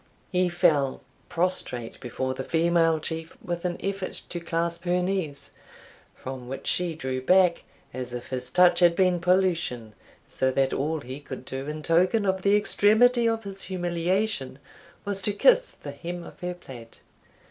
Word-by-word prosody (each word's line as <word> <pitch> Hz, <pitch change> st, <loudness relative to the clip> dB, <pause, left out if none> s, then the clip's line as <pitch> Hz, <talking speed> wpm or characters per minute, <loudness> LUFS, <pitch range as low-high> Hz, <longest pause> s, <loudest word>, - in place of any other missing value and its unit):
He 180 Hz, -1 st, +2 dB
fell 160 Hz, -6 st, +2 dB, 0.3 s
prostrate 165 Hz, -10 st, -2 dB
before 130 Hz, +1 st, -3 dB
the 130 Hz, -, -5 dB
female 165 Hz, +1 st, +2 dB
Chief 160 Hz, +1 st, -6 dB
with 175 Hz, 0 st, -4 dB
an 175 Hz, -1 st, -1 dB
effort 195 Hz, -1 st, -3 dB, 0.2 s
to 175 Hz, -, -4 dB
clasp 170 Hz, 0 st, -2 dB
her 180 Hz, +1 st, +2 dB
knees, 180 Hz, -6 st, -3 dB, 0.6 s
from 130 Hz, -1 st, -7 dB
which 135 Hz, +2 st, -6 dB
she 175 Hz, -2 st, 0 dB
drew 130 Hz, -3 st, -3 dB
back, 180 Hz, +4 st, +4 dB, 0.3 s
as 125 Hz, -1 st, -5 dB
if 120 Hz, 0 st, -6 dB
his 125 Hz, -1 st, -4 dB
touch 180 Hz, +3 st, +5 dB
had 175 Hz, -1 st, +5 dB
been 180 Hz, -1 st, +3 dB
pollution, 175 Hz, -, +1 dB, 0.3 s
so 130 Hz, -, 0 dB
that 135 Hz, 0 st, +1 dB
all 155 Hz, +2 st, -1 dB
he 130 Hz, +1 st, -7 dB
could 130 Hz, -3 st, -9 dB
do 135 Hz, +2 st, -5 dB
in 155 Hz, 0 st, -5 dB
token 180 Hz, +6 st, +3 dB
of 190 Hz, -1 st, 0 dB
the 200 Hz, +2 st, +4 dB
extremity 230 Hz, +3 st, +4 dB
of 225 Hz, 0 st, -2 dB
his 195 Hz, -1 st, -7 dB
humiliation, 175 Hz, -3 st, -1 dB, 0.5 s
was 200 Hz, -1 st, -1 dB
to 205 Hz, +2 st, +1 dB
kiss -, -, +4 dB
the 145 Hz, -, -9 dB
hem 170 Hz, +4 st, -6 dB
of -, -, -12 dB
her 180 Hz, 0 st, -4 dB
plaid. 120 Hz, -9 st, -12 dB
170 Hz, 165 wpm, -26 LUFS, 135-185 Hz, 0.6 s, touch